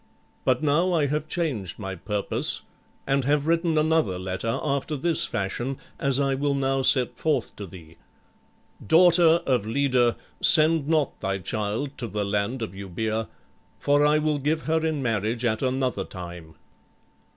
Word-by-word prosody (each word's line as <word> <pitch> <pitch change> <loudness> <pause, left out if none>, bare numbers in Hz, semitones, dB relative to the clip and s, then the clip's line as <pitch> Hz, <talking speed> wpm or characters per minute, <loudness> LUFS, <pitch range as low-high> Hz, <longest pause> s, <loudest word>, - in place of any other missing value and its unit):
But 130 +2 +1
now 165 +5 +2
I 155 -4 +2
have 150 +2 -2
changed 135 - -3
my 95 -3 -5
purpose 100 +3 -1 0.4
and 135 0 +1
have 145 +1 +1
written 165 0 +1
another 155 - +1
letter 95 +7 -3
after 145 +1 -2
this 170 +3 +3
fashion, 120 +7 -3 0.2
as 140 -1 +2
I 135 -1 +1
will 140 +1 -1
now 135 0 0
set 125 -2 +3
forth 145 -7 -1
to 100 - -7
thee: 80 -2 -14 0.9
'_Daughter 170 - +5
of 125 -6 0
Leda, 125 -1 +1 0.2
send 155 -2 +5
not 155 -3 0
thy 95 0 -2
child 105 - -3
to 120 - -4
the 105 -1 -3
land 105 +5 -2
of 110 - -5
Eubœa, 110 +4 -4 0.5
for 145 +1 +2
I 150 +1 +4
will 155 -1 0
give 150 +3 -1
her 160 0 0
in 155 -3 -1
marriage 115 +1 -1
at 110 -1 0
another 130 -6 -1
time. 85 -3 -10
135 Hz, 155 wpm, -25 LUFS, 105-150 Hz, 0.9 s, Daughter